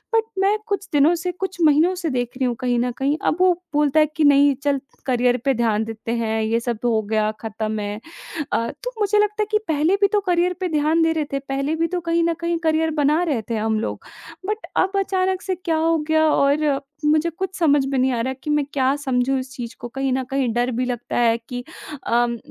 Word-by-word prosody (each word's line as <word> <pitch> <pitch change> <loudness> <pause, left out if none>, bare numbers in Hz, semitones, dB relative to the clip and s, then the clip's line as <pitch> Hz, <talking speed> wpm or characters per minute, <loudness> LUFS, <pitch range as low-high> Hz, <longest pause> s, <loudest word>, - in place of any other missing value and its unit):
But 450 - +4 0.2
मैं 400 +2 +3
कुछ 400 -1 -2
दिनों 295 +4 +5
से 360 +2 -3
कुछ 380 +1 -5
महीनों 315 +4 +4
से 340 -3 -3
देख 245 -2 -1
रही 260 - 0
हूँ 240 -1 0
कहीं 245 -1 0
न 245 0 0
कहीं 280 +3 0
अब 315 - +2
वो 365 -1 +5 0.2
बोलता 295 +1 +3
है 305 - +6
कि 315 - +1
नहीं 285 0 +6
चल, 280 -1 +1 0.3
करियर 250 -1 +2
पे 270 - +3
ध्यान 220 -2 +1
देते 225 0 -6
हैं 220 -1 -1
ये 225 +2 +1
सब 235 -2 -3
हो 225 -2 +2
गया 215 0 0
ख़त्म 220 -1 -3
है। 205 +1 -4 0.5
अ, 230 +2 +1 0.2
तो - - -3
मुझे 415 0 +2
लगता 420 +1 +1
है - - -5
कि 425 - +4
पहले 315 +5 +2
भी 400 - +6
तो 415 - +4
करियर 355 +1 +2
पे 365 - 0
ध्यान 310 +1 +2
दे 325 - +3
रहे 310 -2 -1
थे 275 - 0
पहले 275 +3 -2
भी 330 +1 0
तो 360 0 -2
कहीं 335 0 +1
न 335 0 +2
कहीं 335 0 0
करियर 320 -1 +1
बना 300 +4 +3
रहते 240 -8 -2
हैं 215 - -1
हम 220 -1 0
लोग - - -4 0.4
बट 425 +2 -3
अब 375 - +2
अचानक 375 -1 0
से 375 -1 -2
क्या 330 -2 -1
हो 330 +1 +2
गया 315 0 +4
और 280 0 +2 0.2
मुझे 310 +2 +3
कुछ 375 +3 -5
समझ 290 -4 +3
में 270 0 -1
नहीं 260 +1 +2
आ 235 - -1
रहा 260 +2 -1
कि 300 - -5
मैं 295 -1 +2
क्या 270 0 +2
समझूँ 265 -1 0
इस 260 0 -6
चीज़ 240 -1 -6
को 240 - -6
कहीं 270 +1 -2
न 260 0 0
कहीं 270 -2 +1
डर 245 +2 0
भी 250 +2 -1
लगता 245 -1 -3
है 230 -1 +3
कि 245 0 -5 0.4
अम, 235 0 +1
285 Hz, 240 wpm, -22 LUFS, 245-335 Hz, 0.5 s, है